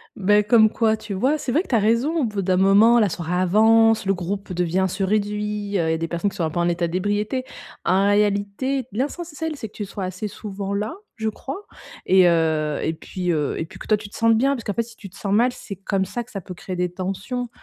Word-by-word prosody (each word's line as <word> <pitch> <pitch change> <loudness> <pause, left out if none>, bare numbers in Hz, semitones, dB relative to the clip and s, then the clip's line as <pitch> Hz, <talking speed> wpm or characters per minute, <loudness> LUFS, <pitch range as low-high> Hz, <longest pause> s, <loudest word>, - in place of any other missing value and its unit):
Bah, 205 +1 +4
comme 220 +1 +5
quoi, 220 -2 +2
tu 210 - -7
vois, 260 +11 +1
c'est 260 - -3
vrai 310 +8 +3
que - - -11
tu 250 - +1
as - - +5
raison, 235 +10 +2
au - - +1
bout 210 -3 -1
d'un 185 -1 +1
moment 205 +5 +6
la 210 -3 +3
soirée 170 +1 -4
avance, 220 +4 +4
le 195 - +2
groupe 190 +2 -4
devient 180 +2 +1
se 195 - -3
réduit, 210 0 -1
heu, 165 -3 +1
il - - +2
y - - +2
a - - 0
des 165 0 -3
personnes 175 +4 -1
qui 200 - -12
sont 170 - -1
un 160 - +1
peu 175 - -3
en 170 - +2
état 170 0 0
d'ébriété. 205 +8 -1 0.4
En 190 +3 +3
réalité, 205 +6 +1
l'essentiel 310 - -3
c'est 225 - -6
que 205 - -23
tu 205 - -4
sois 195 -1 -5
assez 185 +3 -4
souvent 200 -1 -5
là, 210 - -2 0.2
je 220 -1 -1
crois 275 - -7 0.4
et 185 -1 +6
heu 160 -3 +1
et 160 - 0
puis, 180 +2 -3
heu 150 -3 -1
et 160 - -2
puis - - -14
que - - -9
toi 215 - +4
tu 205 - -10
te - - -14
sentes 225 0 +4
bien, 275 +3 +2
parce 235 - -7
qu'en 205 - -2
fait 230 - 0
si 225 0 -14
tu 195 - -11
te 180 - -19
sens 200 -1 -2
mal, 240 +4 +4
c'est 205 -4 -8
comme 195 0 -1
ça 240 +4 -4
que - - -20
ça 195 - -5
peut 180 - -8
créer 185 +1 -6
des 180 0 -1
tensions. 195 +7 -4
205 Hz, 265 wpm, -22 LUFS, 185-225 Hz, 0.4 s, moment